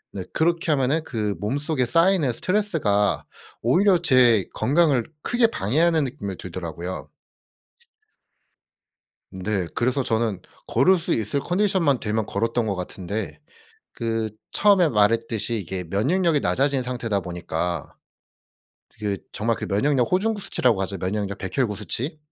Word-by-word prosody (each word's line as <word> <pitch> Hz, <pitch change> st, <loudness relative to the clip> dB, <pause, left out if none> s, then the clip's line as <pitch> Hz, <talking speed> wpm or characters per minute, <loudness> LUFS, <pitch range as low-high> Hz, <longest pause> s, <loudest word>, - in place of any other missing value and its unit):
네 95 Hz, -, -4 dB
그렇게 165 Hz, 0 st, +1 dB
하면은 145 Hz, +3 st, +1 dB
그 105 Hz, -7 st, -2 dB
몸속에 140 Hz, -, 0 dB
쌓이는 165 Hz, +1 st, +3 dB
스트레스가 150 Hz, -, 0 dB, 0.4 s
오히려 180 Hz, -, +4 dB
제 125 Hz, -, +4 dB
건강을 140 Hz, 0 st, +2 dB, 0.2 s
크게 240 Hz, -1 st, +3 dB
방해하는 160 Hz, -, +1 dB
느낌을 120 Hz, -9 st, -5 dB
들더라고요. 90 Hz, 0 st, -6 dB, 2.2 s
네. 95 Hz, 0 st, -2 dB
그래서 130 Hz, +3 st, +1 dB
저는 110 Hz, -5 st, 0 dB, 0.3 s
걸을 160 Hz, +11 st, +4 dB
수 170 Hz, -, -2 dB
있을 115 Hz, +6 st, 0 dB
컨디션만 180 Hz, -6 st, +1 dB
되면 110 Hz, 0 st, -1 dB
걸었던 115 Hz, +3 st, -1 dB
것 100 Hz, -2 st, -1 dB
같은데 95 Hz, +7 st, -5 dB, 0.5 s
그 115 Hz, -2 st, -2 dB, 0.2 s
처음에 195 Hz, -5 st, +4 dB
말했듯이 115 Hz, +1 st, +1 dB
이게 95 Hz, 0 st, -4 dB
면역력이 145 Hz, -, +1 dB
낮아진 135 Hz, -1 st, +1 dB
상태다 115 Hz, -5 st, -2 dB
보니까 85 Hz, -1 st, -4 dB, 1.0 s
저기 100 Hz, -3 st, -4 dB
정말 115 Hz, +1 st, -1 dB
그 -, -, -5 dB
면역력 125 Hz, +5 st, +1 dB
호중구 205 Hz, +3 st, +1 dB
수치라고 120 Hz, -, +1 dB
하죠 95 Hz, 0 st, -4 dB
면역력 100 Hz, +2 st, -3 dB
백혈구 105 Hz, +3 st, -1 dB
수치. 130 Hz, +9 st, -2 dB
120 Hz, 300 characters per minute, -23 LUFS, 100-155 Hz, 2.2 s, 오히려